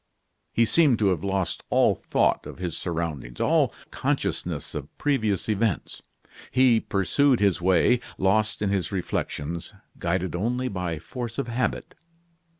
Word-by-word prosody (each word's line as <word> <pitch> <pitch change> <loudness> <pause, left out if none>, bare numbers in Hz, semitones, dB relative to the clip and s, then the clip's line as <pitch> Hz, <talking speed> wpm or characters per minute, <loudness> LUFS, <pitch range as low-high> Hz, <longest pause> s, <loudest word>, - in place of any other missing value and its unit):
He 115 - +3
seemed 145 -1 +4
to 105 -3 +3
have 90 -4 -1
lost 95 -3 -1
all - - +4
thought - - 0
of - - -9
his 90 -3 -4
surroundings 80 -8 -4
all - - +3 0.2
consciousness - - -2
of 75 -1 -7
previous 110 -9 0
events. 110 -2 -1 0.5
He 125 -3 +4
pursued 125 +8 +2
his 100 -4 +2
way, 95 +7 +4 0.2
lost 105 +2 +1
in 100 - +1
his 95 -5 -1
reflections, 85 -3 -3 0.2
guided 90 +1 -1
only 125 +7 -1
by 90 -4 -3
force 115 +9 -6
of 140 -3 -2
habit. 120 -1 -2
100 Hz, 140 wpm, -25 LUFS, 85-115 Hz, 0.5 s, seemed